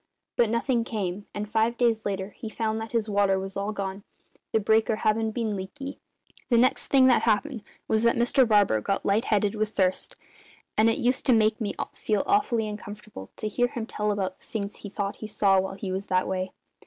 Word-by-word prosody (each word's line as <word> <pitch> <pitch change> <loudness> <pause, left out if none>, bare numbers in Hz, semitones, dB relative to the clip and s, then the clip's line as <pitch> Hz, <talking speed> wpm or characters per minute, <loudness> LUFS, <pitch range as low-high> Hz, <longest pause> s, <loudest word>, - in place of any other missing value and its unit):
But 235 -2 +3
nothing 235 +1 +1
came, 200 -3 -4
and 205 +1 -4
five 225 +2 +1
days 230 -3 +1
later 195 0 -3
he 220 - -8
found 220 0 -2
that 225 - -6
his 230 -2 0
water 200 -2 +2
was 190 0 -5
all 200 +2 -2
gone, 195 -1 -4 0.5
the 220 - +3
breaker 220 +1 +2
havin' 220 +1 +1
been 220 -1 -2
leaky. 270 +9 -7 0.5
The 240 - +4
next 250 +2 +3
thing 270 -2 +5
that 255 -2 +5
happened 230 +3 0 0.3
was 220 - +2
that 235 0 +3
Mr 240 +2 +3
Barker 205 - +4
got 195 - -2
light 210 +5 +2
headed 205 -1 +1
with 215 -1 -1
thirst; 190 - 0 0.6
and 220 +1 +4
it 225 - +1
used 250 +3 0
to 255 - +6
make 220 0 +3
me 205 - -2 0.2
feel 210 -2 -1
awfully 320 - +2
uncomfortable 210 - -8
to 215 - -4
hear 245 +3 +1
him 235 -2 -5
tell 210 -2 -2
about 190 -2 -3
the - - -24
things 200 -2 -4
he 205 - -8
thought 200 0 -3
he 215 - -7
saw 200 -2 +3
while 190 +1 -3
he 195 -1 -5
was 190 +2 -3
that 185 0 +1
way. 185 0 -2
215 Hz, 210 wpm, -26 LUFS, 200-230 Hz, 0.6 s, to